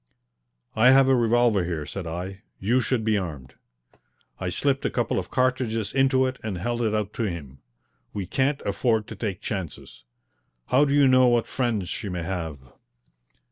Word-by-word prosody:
"I 115 +3 +6
have 135 0 +6
a 135 - +5
revolver 120 -4 +3
here," 85 -4 -3
said 95 +1 -6
I. 90 +4 -5 0.2
"You 120 +7 +2
should 125 -3 0
be 110 -1 +2
armed." 75 -9 -7 0.9
I 90 - -2
slipped 135 +8 0
a - - +1
couple 120 -5 0
of 90 - -6
cartridges 125 -5 0
into 135 -1 +3
it 130 0 -3
and 105 -4 -3
held 120 +6 -2
it 110 -2 +1
out 105 -1 -2
to 115 - -2
him. 75 -8 -6 0.5
"We 100 -2 -4
can't 135 +9 0
afford 110 +2 +1
to 110 - -7
take 100 -2 -4
chances. 85 - -6 0.7
How 135 +4 +5
do 140 0 +1
you 145 -2 +5
know 130 -1 +5
what 120 -1 +3
friends 115 -7 -1
she 100 +2 -4
may 90 -2 -3
have?" 80 -4 -4
110 Hz, 180 wpm, -25 LUFS, 95-130 Hz, 0.9 s, I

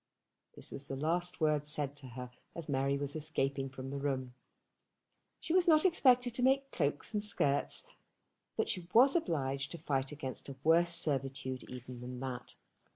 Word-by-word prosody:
This - - -9
was 140 - -6
the 135 - -4
last 170 +5 0
word 150 -2 +2
said 145 -2 -2
to 140 -2 -10
her 125 0 -7 0.2
as 170 -2 -5
Mary 140 0 +1
was 145 +1 -3
escaping 135 -3 -1
from 130 0 -7
the 140 - -3
room. 130 -3 -2 1.1
She 320 - -2
was 365 -1 +4
not 310 +1 +6
expected 250 -8 +4
to 245 - -1
make 270 +2 +3
cloaks 145 +8 -1
and 210 -1 0
skirts, 145 -9 +1 0.7
but - - +1
she 180 -2 -3
was 260 +6 +7
obliged 140 - 0
to - - -5
fight 135 -4 -1
against 140 -2 -6
a 135 - -6
worse 170 +2 +5
servitude 135 -4 -2
even 125 -1 -8
than 125 0 -6
that. 130 -2 -5
145 Hz, 170 wpm, -34 LUFS, 135-175 Hz, 1.1 s, was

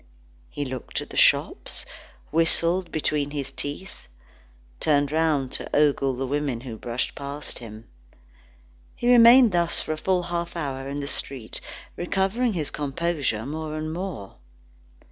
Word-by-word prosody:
He 145 - -4
looked 130 -1 -4
at - - -8
the - - -8
shops, - - +2 0.5
whistled 170 +2 +2
between 150 -2 0
his 145 -2 -3
teeth, 145 +7 -7 0.7
turned 145 -2 +2
round 155 -4 +1
to - - -3
ogle 140 -3 +3
the 135 +2 -2
women 140 -3 -1
who 125 -3 -7
brushed 120 +2 -3
past 140 +1 -6
him. 110 -1 -10 1.1
He 240 - -2
remained 240 0 +8
thus 170 -1 +1
for - - -2
a - - -5
full 180 +2 +1
half 170 0 -3
hour 135 -4 -3
in 145 +1 -3
the 140 - -4
street, 130 -5 -4 0.3
recovering 195 +7 0
his 155 -5 -2
composure 145 -6 -1
more 155 +2 -4
and 155 0 -3
more. 170 - -6
150 Hz, 145 wpm, -25 LUFS, 135-170 Hz, 1.1 s, remained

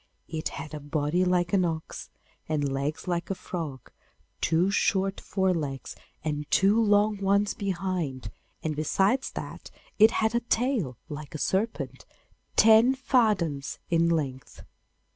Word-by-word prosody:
It 160 -1 -3
had 145 +2 -7
a 150 - -4
body 150 +4 0
like 180 -1 +1
an 190 -2 +4
ox, 160 -2 -4 0.4
and 150 -2 0
legs 145 +5 -3
like 175 -1 -2
a 195 - -1
frog, 155 -9 -6 0.5
two 170 +4 +2
short 195 -1 +1
fore 190 -2 +1
legs, 140 -5 -4 0.3
and 150 -1 -3
two 200 +4 +4
long 210 0 +3
ones 200 +1 +2
behind, 175 - -3 0.3
and 155 -1 -1
besides 195 - +1
that - - -7 0.3
it 220 +1 +8
had 220 -1 0
a 235 - +3
tail 235 - 0
like 150 -1 -8
a - - -1
serpent, 200 +8 -2 0.5
ten 225 +4 +6
fathoms 210 - +1
in 170 0 +3
length. 140 -6 -3
175 Hz, 140 wpm, -27 LUFS, 150-205 Hz, 0.5 s, it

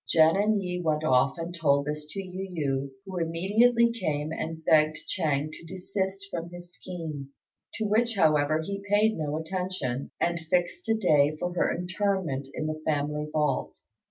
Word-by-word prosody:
Jen 160 +1 +6
and 210 +1 +2
Yi 180 -1 -3
went 155 -2 0
off 130 -1 +3
and 165 +1 -5
told 140 -4 +2
this 150 0 -4
to 195 +5 -5
Yu 185 +1 -6
yü, 140 -5 -1 0.2
who 190 -2 -4
immediately 215 +9 +3
came 155 -9 -2
and 160 0 -5
begged 155 0 +4
Ch'êng 150 -1 0
to - - -11
desist 190 +2 -3
from 170 0 -4
his 175 0 -11
scheme; 155 -6 -6 0.5
to 220 - -1
which, 225 +2 +2
however, 155 -3 +3
he 200 +4 -4
paid 215 +2 +4
no 150 -1 -2
attention, 160 -6 -3
and 170 0 +1
fixed 175 +5 0
a 225 - +4
day 155 -7 +3
for 175 0 -2
her 175 - +1
interment 180 -6 -1
in 155 - -4
the 155 0 -3
family 150 0 -1
vault. 150 -3 0
165 Hz, 170 wpm, -28 LUFS, 150-190 Hz, 0.5 s, Jen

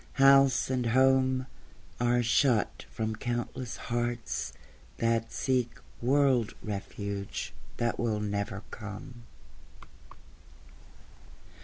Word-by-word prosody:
House 135 -2 +5
and 125 -2 0
home 130 +1 +4 0.5
Are 120 0 +3
shut 120 -1 +2
from 110 0 -2
countless 120 +1 -3
hearts 120 -1 -2 0.5
that 115 0 +1
seek 125 -3 0 0.2
World 130 -3 +3
refuge 100 -1 -4 0.2
that 120 0 0
will 110 -3 0
never 100 -1 -2
come. 115 +3 -8
120 Hz, 85 wpm, -30 LUFS, 110-130 Hz, 0.5 s, House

